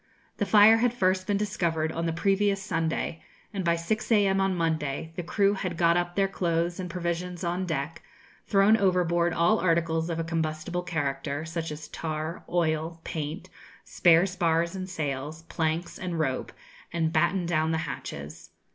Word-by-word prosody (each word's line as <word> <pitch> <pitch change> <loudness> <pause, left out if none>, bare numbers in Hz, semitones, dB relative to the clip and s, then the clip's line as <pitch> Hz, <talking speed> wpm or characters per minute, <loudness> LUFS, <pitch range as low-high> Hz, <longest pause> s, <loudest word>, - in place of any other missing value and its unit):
The 205 - -1
fire 215 +1 +7
had 240 +1 +1
first 185 -3 +1
been 205 - +2
discovered 170 -6 -1
on 165 +1 -2
the - - +1
previous 195 +3 +1
Sunday, 165 -2 -2 0.3
and 195 -2 -2
by 170 -1 +3
6 215 +9 -2
a.m. 195 -3 +4
on 195 -1 +1
Monday 160 -2 -2
the - - -3
crew 200 +3 +2
had 185 -4 -3
got 170 0 +4
up 175 0 -1
their 195 -1 +3
clothes 170 -2 -1
and 180 -1 -4
provisions 175 0 -3
on 175 +2 -1
deck, 155 0 -3 0.5
thrown 200 +2 +5
overboard 175 -4 +2
all 170 +7 +3
articles 165 -1 +1
of 165 - -2
a 165 - -1
combustible 165 +1 -2
character, 145 -3 -2
such 165 0 -4
as 150 0 -7
tar, 155 +1 -4
oil, 165 -1 0
paint, 155 +3 -5 0.4
spare 170 0 +4
spars 170 -3 0
and 185 0 -5
sails, 150 -1 -4
planks, 165 +1 -2
and 180 -2 -3
rope, 135 -5 -1 0.4
and 165 -1 0
battened 170 +2 +2
down 160 -1 +1
the 160 - +1
hatches. 70 +1 -7
170 Hz, 165 wpm, -27 LUFS, 160-185 Hz, 0.5 s, fire